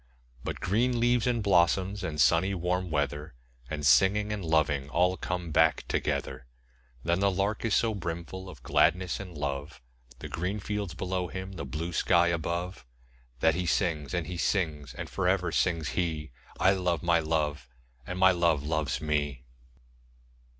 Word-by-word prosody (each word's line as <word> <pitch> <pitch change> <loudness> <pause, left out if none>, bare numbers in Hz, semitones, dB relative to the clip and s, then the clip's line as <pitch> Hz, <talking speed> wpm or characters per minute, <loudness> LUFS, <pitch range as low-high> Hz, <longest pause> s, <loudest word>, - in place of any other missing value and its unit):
But - - -4
green 120 +6 +1
leaves, 120 0 +2
and 120 -3 +1
blossoms, 95 +1 +2
and 80 -4 -4
sunny 90 +6 +4
warm 90 +1 -1
weather, 75 -2 -2 0.3
5 - - -18
And 75 -2 -3
singing, 100 - +4
and 100 -2 -4
loving 75 -4 +1
all 90 +4 +2
come 90 -3 -4
back 80 0 +3
together. 65 - -2 0.6
But 85 +2 +2
the 100 0 +3
Lark 100 +3 -1
is 110 - +2
so 115 -1 +2
brimful 90 0 -5
of 80 -9 -12
gladness 90 +2 +2
and 90 -5 -8
love, 70 +1 -4 0.4
The - - -7
green 90 +5 -3
fields 100 -3 -4
below 90 0 -2
him, 95 +2 -6
the 90 -7 -6
blue 80 +6 -4
sky 85 +1 +3
above, 85 -1 -3 0.6
That 80 0 +4
he 90 +2 -2
sings, 80 -2 0
and 85 -2 -1
he 90 - -5
sings; 80 -6 -1
and - - -5
for 95 -2 -2
ever 90 -2 +1
sings 80 -4 +1
he 80 -5 -2 0.3
'I 95 - +5
love 90 -5 0
my 85 -1 +3
Love, 75 -5 -1 0.4
and 90 - -4
my 95 0 +6
Love 85 -5 +2
loves 80 -1 -1
me!' 75 -4 -1
85 Hz, 165 wpm, -29 LUFS, 75-95 Hz, 0.6 s, my